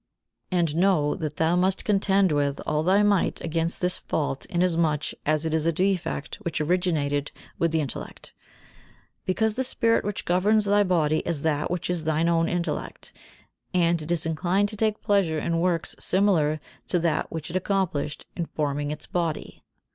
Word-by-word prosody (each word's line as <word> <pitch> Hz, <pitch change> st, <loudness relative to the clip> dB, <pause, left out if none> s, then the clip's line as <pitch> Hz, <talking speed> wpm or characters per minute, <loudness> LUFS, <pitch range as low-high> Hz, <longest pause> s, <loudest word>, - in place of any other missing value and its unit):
And 170 Hz, -4 st, +1 dB
know 170 Hz, -5 st, +3 dB
that 155 Hz, -2 st, -4 dB
thou 165 Hz, +2 st, +2 dB
must 185 Hz, +1 st, +1 dB
contend 195 Hz, -2 st, +3 dB
with 145 Hz, -1 st, 0 dB
all 150 Hz, -, 0 dB
thy 190 Hz, +5 st, +3 dB
might 205 Hz, -3 st, +2 dB
against 165 Hz, +1 st, -1 dB
this 180 Hz, 0 st, +1 dB
fault 140 Hz, -3 st, -3 dB
inasmuch 170 Hz, -5 st, +1 dB
as 155 Hz, +1 st, +1 dB
it 160 Hz, -, -1 dB
is 160 Hz, 0 st, +1 dB
a -, -, +4 dB
defect 180 Hz, -4 st, -1 dB
which 170 Hz, -, -3 dB
originated 150 Hz, -4 st, 0 dB, 0.3 s
with 165 Hz, -1 st, +2 dB
the 160 Hz, -1 st, +1 dB
intellect; 140 Hz, -, -7 dB, 0.9 s
because 220 Hz, +4 st, +1 dB
the 260 Hz, +4 st, -1 dB
spirit 230 Hz, -3 st, +3 dB
which 205 Hz, 0 st, -4 dB
governs 205 Hz, +4 st, +3 dB
thy 205 Hz, +1 st, +4 dB
body 160 Hz, -5 st, +2 dB
is 165 Hz, -4 st, -3 dB
that 155 Hz, -2 st, 0 dB
which 180 Hz, -1 st, -2 dB
is 175 Hz, -2 st, -2 dB
thine 160 Hz, +1 st, +1 dB
own 165 Hz, 0 st, +2 dB
intellect, 170 Hz, -4 st, -4 dB, 0.6 s
and 170 Hz, -2 st, +2 dB
it 155 Hz, +3 st, -5 dB
is 165 Hz, -2 st, 0 dB
inclined 180 Hz, +5 st, +1 dB
to 215 Hz, -, -6 dB
take 215 Hz, 0 st, -1 dB
pleasure 195 Hz, -6 st, +2 dB
in 165 Hz, +2 st, -1 dB
works 170 Hz, -2 st, 0 dB
similar 170 Hz, -6 st, +2 dB, 0.3 s
to 180 Hz, -, +1 dB
that 165 Hz, -2 st, 0 dB
which 160 Hz, 0 st, -5 dB
it -, -, -7 dB
accomplished 185 Hz, -6 st, -1 dB
in 170 Hz, -2 st, -3 dB
forming 145 Hz, -1 st, -2 dB
its 150 Hz, 0 st, -6 dB
body. 170 Hz, -3 st, -3 dB
170 Hz, 170 wpm, -25 LUFS, 155-185 Hz, 0.9 s, a